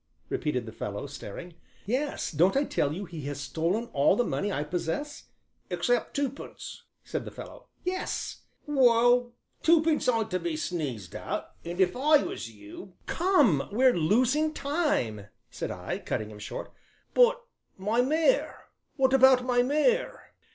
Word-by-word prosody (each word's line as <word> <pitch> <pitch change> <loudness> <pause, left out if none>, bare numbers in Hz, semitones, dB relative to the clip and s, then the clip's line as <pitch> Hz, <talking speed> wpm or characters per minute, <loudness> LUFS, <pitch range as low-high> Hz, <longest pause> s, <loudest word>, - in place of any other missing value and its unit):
repeated 125 -6 -1
the 110 - -8
fellow, 105 +1 -5
staring. 145 - -8 0.3
"Yes, 265 +7 -1
don't 175 - +3
I 280 - +3
tell 145 - 0
you 190 +6 -4
he 170 -3 -8
has 145 -1 -4
stolen 165 - -1
all 140 +6 +4
the 245 - +2
money 205 -3 -2
I 145 - -1
possess?" 175 - -4 0.4
"Except 245 -1 0
twopence," 280 -1 -5 0.2
said - - -4
the - - -7
fellow. - - -11 0.2
"Yes 370 +1 -3
" - - -44
"Well, 245 -3 +4 0.3
twopence 315 -4 +3
ain't 225 -3 0
to 185 - 0
be 170 -2 -3
sneezed 140 - -4
at, - - -4
and 175 +2 -6
if 185 +2 +3
I 295 +3 +4
was - - -5
you 110 - -12
" - - -36
"Come, 290 - +3
we're 255 +4 +4
losing 255 - +2
time," 280 - -1 0.2
said - - -4
I, - - -4
cutting 110 0 -3
him 105 - -11
short. 105 - -6 0.4
"But - - +5 0.4
my 210 +5 +1
mare, 315 - +1 0.3
what 265 -2 +2
about 260 -1 +6
my 245 -1 +3
mare?" 300 - 0
230 Hz, 155 wpm, -28 LUFS, -, 0.4 s, about